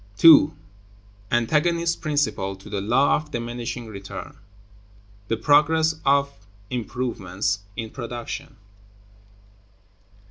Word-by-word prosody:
§ - - -28
2. 155 +2 +8 0.8
Antagonist 165 +8 +1
Principle 130 - -1
to 100 +2 -14
the 100 -2 -2
Law 125 +7 +3
of 150 0 -8
Diminishing 120 -1 -5
Return; 100 -3 -8 0.9
the 115 - -1
Progress 155 +5 +3
of 140 0 +2 0.4
Improvements 105 -6 -2 0.2
in 110 -2 -5
Production. 120 -2 -7
120 Hz, 95 wpm, -23 LUFS, 110-150 Hz, 0.9 s, 2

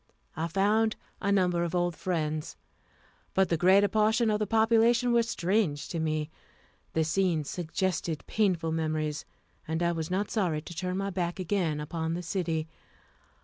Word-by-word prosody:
I 160 +2 -1
found 210 +5 +2 0.3
a 200 - +1
number 180 -3 +2
of 170 +1 -2
old 175 -1 +1
friends, 155 - -2 0.8
but 190 -2 +3
the 170 - +2
greater 190 +5 +5
portion 220 +2 +2
of 210 - +1
the 210 - -1
population 230 +3 +3
were 235 - +5
strange 185 -8 0
to 170 - -3
me. 155 -1 -1 0.6
The 160 - +2
scenes 165 -2 0
suggested 175 -2 -2
painful 180 -7 +1
memories, 155 -1 -2 0.4
and 160 +2 -1
I 170 - +2
was 165 -2 -3
not 195 +3 -1
sorry 170 -8 0
to 175 - -9
turn 185 +1 -2
my 195 0 -2
back 175 -1 -2
again 175 -5 0
upon 160 +2 -3
the 175 - -4
city. 165 -3 -2
175 Hz, 160 wpm, -29 LUFS, 160-200 Hz, 0.8 s, greater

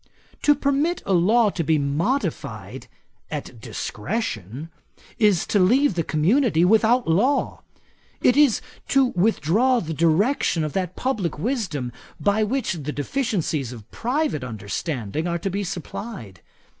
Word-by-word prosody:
'To 295 - +5
permit 285 +5 0
a 195 - +1
law 210 +5 +4
to 170 - -2
be 155 +1 +2
modified 160 - -2 0.4
at - - -6
discretion, 140 - -4 0.5
is 205 -6 +3
to 205 - +1
leave 250 +8 +4
the 170 - 0
community 175 - +2
without 225 +5 +3
law. 230 - +1 0.6
It 250 - +4
is 285 -6 +4 0.3
to 270 -1 +4
withdraw 220 - +2
the 165 -6 -4
direction 170 - +2
of 155 - -3
that 185 -2 -2
publick 215 - -2
wisdom, 175 - -2 0.3
by 205 +1 +2
which 255 +1 -1
the 150 -4 -4
deficiencies 155 - -2
of 115 -4 -11
private 255 - -1
understanding 120 - -4
are 170 0 0
to 190 +3 -3
be 200 +2 -2
supplied. 175 - -7
190 Hz, 130 wpm, -23 LUFS, 155-240 Hz, 0.6 s, To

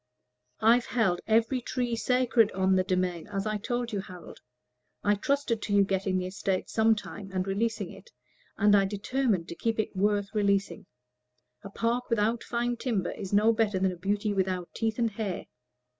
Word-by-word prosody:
"I've 235 +2 +4
held 190 -8 +1
every 230 +3 +2
tree 245 -1 -2
sacred 245 -2 +2
on 190 0 +2
the 185 - +3
demesne, 180 -2 -1
as 200 -1 -3
I 215 0 -1
told 240 +2 -3
you, 200 - 0
Harold. 180 -2 -11 0.6
I 205 - +4
trusted 235 +1 0
to 205 - -3
your 200 - +6
getting 190 -1 0
the 180 - -2
estate 185 0 -2
some 220 0 +4
time, 205 -1 -8
and 185 -1 -1
releasing 215 +3 -1
it; - - -14 0.5
and 205 0 +5
I 195 -1 +4
determined 205 -2 -1
to - - -6
keep 225 +5 -1
it 215 - -2
worth 205 +1 +1
releasing. 200 -3 0 0.8
A 200 - -7
park 235 +4 -1
without 230 0 +1
fine 240 0 -1
timber 220 -8 -1
is 195 -2 -7
no 210 +3 +4
better 215 -3 +1
than 190 0 +1
a - - -6
beauty 205 +3 -1
without 185 -2 -1
teeth 225 -1 -1
and 230 -2 +1
hair." 205 -3 -4
205 Hz, 180 wpm, -28 LUFS, 190-230 Hz, 0.8 s, your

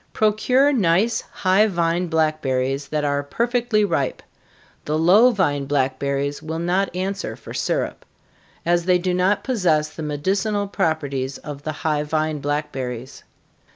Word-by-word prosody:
_ - - -39
Procure 250 +7 +3
nice, 215 +1 +2
high 190 +3 +3
vine 170 -2 0
blackberries, 140 -4 0
that 150 0 -1
are 145 0 +1
perfectly 235 - 0
ripe 140 -9 -1 0.6
the 155 +1 0
low 190 +10 +6
vine 145 - 0
blackberries 140 +1 -1
will 160 +1 -4
not 180 +4 0
answer 195 +2 -3
for - - -11
syrup, - - -2 0.6
as 175 0 +2
they 180 -1 +4
do 180 +1 -1
not 185 +3 +1
possess 175 -12 +1
the - - -9
medicinal 195 +8 -1
properties 140 -7 -1
of 145 -2 -8
the 155 - -3
high 150 -2 +2
vine 155 0 -1
blackberries. 135 -4 -4
160 Hz, 140 wpm, -22 LUFS, 145-195 Hz, 0.6 s, low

